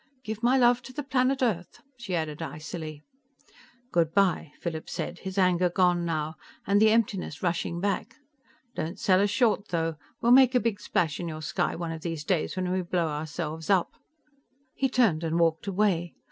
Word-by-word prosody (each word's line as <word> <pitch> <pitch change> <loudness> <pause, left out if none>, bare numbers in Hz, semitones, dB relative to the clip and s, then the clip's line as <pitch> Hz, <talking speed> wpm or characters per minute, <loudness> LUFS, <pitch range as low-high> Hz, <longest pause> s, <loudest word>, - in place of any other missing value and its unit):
"Give 220 -2 -5
my 250 +2 +4
love 245 -1 +4
to - - -11
the 295 - -4
planet 265 0 +1
Earth," 180 -8 -1 0.2
she 220 -7 -4
added 155 -3 -3
icily. 155 +1 -6 0.9
"Good 165 -1 +1
by," 185 -6 +2
Philip 160 -2 -5
said, 175 - -4
his 190 0 -6
anger 180 -1 +3
gone 175 -1 +2
now, 155 -1 -2 0.3
and 200 +1 +3
the 220 - +7
emptiness 210 -8 0
rushing 170 -1 -1
back. 200 +2 -2 0.6
"Don't 165 +4 -4
sell 185 -1 +3
us 205 - +2
short, 210 -1 +2
though 165 -2 -1 0.2
we'll 235 - +2
make 260 0 +7
a - - +6
big 230 -4 -1
splash 160 -7 -1
in 175 - -4
your 155 -1 -6
sky - - -1
one 170 -1 -4
of 160 -1 -6
these 165 -3 -4
days 170 0 0
when 185 -1 -1
we 185 0 +1
blow 175 -2 -1
ourselves 155 +1 -4
up." 190 -3 +2 0.8
He 270 - 0
turned 220 -11 +2
and 165 +1 0
walked 165 +2 +1
away. 185 -4 0
180 Hz, 185 wpm, -27 LUFS, 165-210 Hz, 0.9 s, the